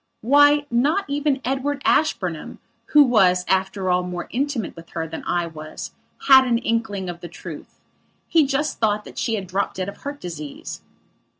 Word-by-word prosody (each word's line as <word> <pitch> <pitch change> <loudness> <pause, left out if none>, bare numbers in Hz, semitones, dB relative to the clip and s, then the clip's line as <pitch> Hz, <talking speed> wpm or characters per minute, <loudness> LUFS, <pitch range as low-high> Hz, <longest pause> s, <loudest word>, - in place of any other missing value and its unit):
Why, 290 +4 +5
not 290 +12 +2
even 285 -1 0
Edward 275 +2 -2
Ashburnham, 180 - 0 0.3
who 300 -1 +7
was, 185 -8 +3
after 190 0 0
all 180 0 +3
more 180 -1 -5
intimate 265 -4 -2
with 165 0 -12
her 165 0 -2
than 160 0 -7
I 175 -1 0
was, 155 -2 -8 0.4
had 265 -1 +8
an 235 -1 +2
inkling 225 -5 -2
of 175 -1 -6
the 175 - -9
truth. 175 - -10 0.5
He 320 -4 +4
just 290 +3 -1
thought 210 -1 +1
that - - -8
she 225 -3 0
had 200 -3 -4
dropped 190 +2 -2
dead 185 +1 -3
of 200 - -10
heart 285 +1 -7
disease. 155 -5 -7
215 Hz, 175 wpm, -22 LUFS, 180-280 Hz, 0.5 s, had